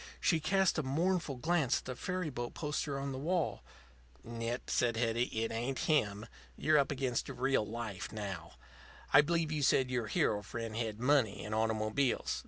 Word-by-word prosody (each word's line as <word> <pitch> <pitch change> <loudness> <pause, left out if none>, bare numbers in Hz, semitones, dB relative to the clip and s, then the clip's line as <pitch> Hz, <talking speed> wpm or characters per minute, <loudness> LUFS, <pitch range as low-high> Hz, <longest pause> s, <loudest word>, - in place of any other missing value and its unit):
She 165 - +3
cast 185 +2 +2
a - - +2
mournful 160 +2 0
glance 155 0 +2
at - - -8
the 130 - -4
ferry 180 +1 -3
boat 120 -2 -5
poster 150 -2 -2
on 140 0 -3
the 130 - -4
wall. 170 +2 0 0.6
"Nit," 115 +1 -4
said 115 -2 +1
Hetty. 115 +1 +1
"It 115 -1 -2
ain't 120 +4 -2
him. 110 -9 +1 0.3
You're 155 -1 +4
up 140 - +2
against 130 -4 -1
real 130 -2 +1
life 110 -3 -5
now. 100 -6 -5 0.6
I 145 - +10
believe 165 +1 0
you 155 -1 -1
said 130 -1 +3
your 120 -3 -1
hero 105 0 +1
friend 115 0 -5
had 110 -2 -2
money 125 -6 +2
and 105 - -4
automobiles. 110 +4 0
125 Hz, 175 wpm, -33 LUFS, 115-150 Hz, 0.6 s, I